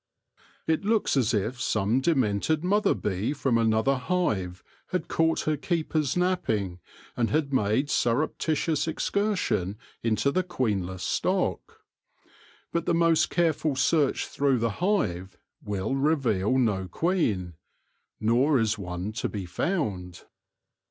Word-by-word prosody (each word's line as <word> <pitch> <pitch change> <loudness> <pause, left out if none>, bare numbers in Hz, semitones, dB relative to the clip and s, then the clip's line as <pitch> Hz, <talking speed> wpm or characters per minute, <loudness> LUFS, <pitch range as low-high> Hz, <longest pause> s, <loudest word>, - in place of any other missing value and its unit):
It 160 +4 0
looks 215 -4 +1
as 125 -3 +2
if 115 +3 -1
some 110 +4 +1
de 165 +4 +2
mented 130 - +1
mother 205 +4 +2
bee 100 +6 -2
from 130 -5 +1
another 115 +4 +2
hive 110 - -1 0.2
had 185 - -2
ca 160 0 +2
ight - - -4
her 155 - 0
keepers 155 -3 -1
napping, 115 - 0 0.4
and 115 -2 0
had 145 -2 0
made 120 +3 +2
surreptitious 150 +5 0
excursion 160 - -1 0.2
into 115 +4 +1
the 185 - +1
queenless 100 - -2
stock. - - -1 0.9
But 170 0 -2
the 170 - +2
most 165 -1 +3
careful 160 -4 +1
search 140 +2 +2
through 140 -2 +1
the 115 -1 0
hive 100 - 0 0.3
will 105 +5 -2
reveal 135 -7 +1
no 105 -7 +1
queen, 105 - 0 0.7
nor 125 +7 +3
is 110 -1 0
one 90 +1 -4
to 110 - -3
be 100 -3 -5
found. 90 - -3
130 Hz, 130 wpm, -27 LUFS, 105-160 Hz, 0.9 s, most